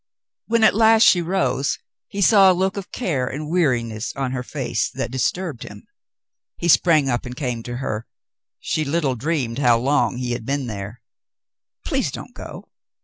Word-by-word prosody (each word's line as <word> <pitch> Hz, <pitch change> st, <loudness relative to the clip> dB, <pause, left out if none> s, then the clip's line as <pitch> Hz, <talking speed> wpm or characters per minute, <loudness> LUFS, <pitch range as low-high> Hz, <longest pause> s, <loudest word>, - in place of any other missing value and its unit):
When 230 Hz, 0 st, +2 dB
at -, -, +6 dB
last 220 Hz, +1 st, +5 dB
she 190 Hz, -5 st, +6 dB
rose, 170 Hz, -5 st, 0 dB, 0.3 s
he 200 Hz, 0 st, -2 dB
saw 195 Hz, -2 st, +7 dB
a 180 Hz, -, 0 dB
look 190 Hz, +1 st, 0 dB
of 200 Hz, -2 st, -7 dB
care 145 Hz, -, -1 dB
and 150 Hz, +4 st, -5 dB
weari 135 Hz, -10 st, +2 dB
ness 110 Hz, 0 st, -5 dB
on 135 Hz, -2 st, -2 dB
her 130 Hz, -1 st, -3 dB
face -, -, -2 dB
that -, -, -4 dB
disturbed 130 Hz, +3 st, -2 dB
him. 105 Hz, 0 st, -10 dB, 0.7 s
He 170 Hz, -, -2 dB
sprang 155 Hz, 0 st, +4 dB
up 120 Hz, -2 st, 0 dB
and 125 Hz, -1 st, -7 dB
came 125 Hz, -5 st, -3 dB
to 120 Hz, +1 st, -6 dB
her. 115 Hz, -4 st, -4 dB, 0.5 s
She 155 Hz, -, -1 dB
little 145 Hz, -2 st, 0 dB
dreamed 130 Hz, -2 st, -2 dB
how 120 Hz, -4 st, +4 dB
long 135 Hz, +1 st, +1 dB
he 125 Hz, -1 st, -3 dB
had 120 Hz, -, -3 dB
been 135 Hz, +2 st, -2 dB
there. 105 Hz, +1 st, -7 dB, 0.8 s
"Please -, -, -1 dB
don't -, -, -9 dB
go. -, -, -10 dB
140 Hz, 180 wpm, -21 LUFS, 120-175 Hz, 0.8 s, saw